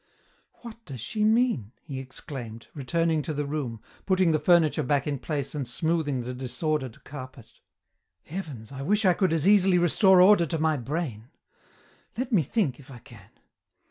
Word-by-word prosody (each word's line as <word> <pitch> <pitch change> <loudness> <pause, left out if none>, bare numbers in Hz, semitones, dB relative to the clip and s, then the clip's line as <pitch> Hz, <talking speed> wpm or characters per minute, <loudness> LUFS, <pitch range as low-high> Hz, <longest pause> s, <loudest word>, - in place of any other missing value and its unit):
"What 235 -1 -10
does 135 -4 -8
she 210 - -2
mean?" 220 - +2
he 135 -4 -6
exclaimed, 130 -3 -8
returning 160 +3 0
to 155 +1 -4
the 145 0 -2
room, 140 -6 -4 0.3
putting 185 -3 +3
the 155 - +2
furniture 165 0 +3
back 140 +1 0
in 145 -3 -2
place 145 -2 -3
and 140 -4 -4
smoothing 150 0 -1
the 125 +1 -5
disordered 130 0 -3
carpet. 130 -4 -9 0.8
"Heavens, 150 - -7
I 135 -1 -7
wish 205 - +1
I 185 - +6
could 185 -1 +1
as 165 +1 +1
easily 195 -3 +5
restore 185 +2 +5
order 180 -2 +6
to 165 - -2
my 155 0 +1
brain. 130 -4 -4 0.9
Let 255 +1 -3
me 205 -7 +4
think, 150 - -1
if 140 - -16
I 130 - -10
can. 120 -4 -16
150 Hz, 170 wpm, -26 LUFS, 130-180 Hz, 0.9 s, I